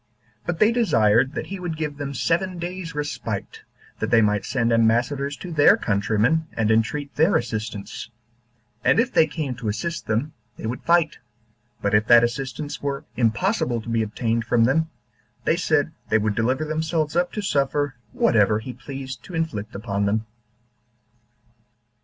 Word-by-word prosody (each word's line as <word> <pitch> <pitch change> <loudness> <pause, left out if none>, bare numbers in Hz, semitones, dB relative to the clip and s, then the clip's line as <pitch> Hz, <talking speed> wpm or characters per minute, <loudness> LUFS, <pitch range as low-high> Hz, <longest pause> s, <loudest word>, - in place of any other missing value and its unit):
But 175 -1 -1
they 215 +5 +5
desired 130 - +3
that - - -3
he 195 0 -6
would 175 -3 -4
give 150 -2 -3
them 140 -1 -5
seven 170 +9 0
days' 175 -1 -5
respite, 150 0 -4 0.4
that - - -1
they 115 - +5
might 105 -1 +1
send 120 -2 +1
ambassadors 120 +5 +2
to 180 - -8
their 145 -3 +6
countrymen, 110 +9 +1
and 110 -1 +1
entreat 140 +6 0
their 160 +6 +4
assistance; 110 0 -3 0.7
and - - +4
if 245 +2 +1
they 155 - +5
came 150 -6 -3
to 115 - -5
assist 170 +11 -3
them, 115 +8 -1 0.2
they - - -7
would 120 +3 -3
fight; 170 -2 +2 0.6
but 100 0 +1
if 105 +1 +3
that 120 0 +8
assistance 135 +4 -3
were 140 -1 -3
impossible 115 +1 +1
to 115 - -8
be 115 -1 +1
obtained 115 +2 -1
from 115 0 +2
them, 160 +7 +2 0.5
they - - +2
said - - +1 0.2
they 110 - +4
would 105 -1 0
deliver 130 +8 0
themselves 155 0 -1
up 175 +1 +2
to 210 - -2
suffer 145 -3 0 0.2
whatever 105 -1 +3
he 115 +3 -6
pleased 135 +1 -7
to 180 - -8
inflict 115 -11 -3
upon 100 -1 -1
them. 110 +2 0
130 Hz, 165 wpm, -23 LUFS, 110-160 Hz, 0.7 s, that